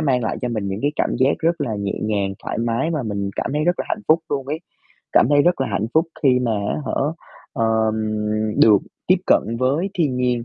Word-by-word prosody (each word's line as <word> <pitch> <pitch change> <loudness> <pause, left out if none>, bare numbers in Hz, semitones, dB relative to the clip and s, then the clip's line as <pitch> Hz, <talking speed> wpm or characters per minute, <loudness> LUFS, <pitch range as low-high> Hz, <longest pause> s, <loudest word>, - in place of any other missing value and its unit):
mang 130 -5 +1
lại 110 - -2
cho 125 - 0
mình 110 -4 -2
những 95 +1 -3
cái 145 +1 +1
cảm - - +1
giác 130 +2 +4
rất 165 0 0
là 120 -7 -1
nhẹ 100 -1 -2
nhàng, 100 -2 -1
thoải - - -4
mái 120 +7 0
và 155 -5 -1
mình 100 -3 -3
cảm - - -2
thấy 150 +1 0
rất 175 +1 +1
là - - -2
hạnh 215 - -2
phúc 160 +1 +6
luôn 135 -2 -2
ấy, 150 +3 -3 0.5
cảm - - +5
thấy 145 0 +5
rất 175 -2 +2
là 135 - +1
hạnh 100 +1 -1
phúc 160 +2 +4 0.2
khi 130 -3 +4
mà, 120 -3 0 0.2
á - - -1
hả, - - -2 0.6
ờ, 115 -5 0 0.2
ừm, 110 - 0 0.7
được 105 -3 +7 0.3
tiếp - - +5
cận - - +5 0.2
với 145 +10 +1
thiên 150 -9 0
nhiên, 125 -2 0
130 Hz, 240 wpm, -21 LUFS, 110-150 Hz, 0.7 s, được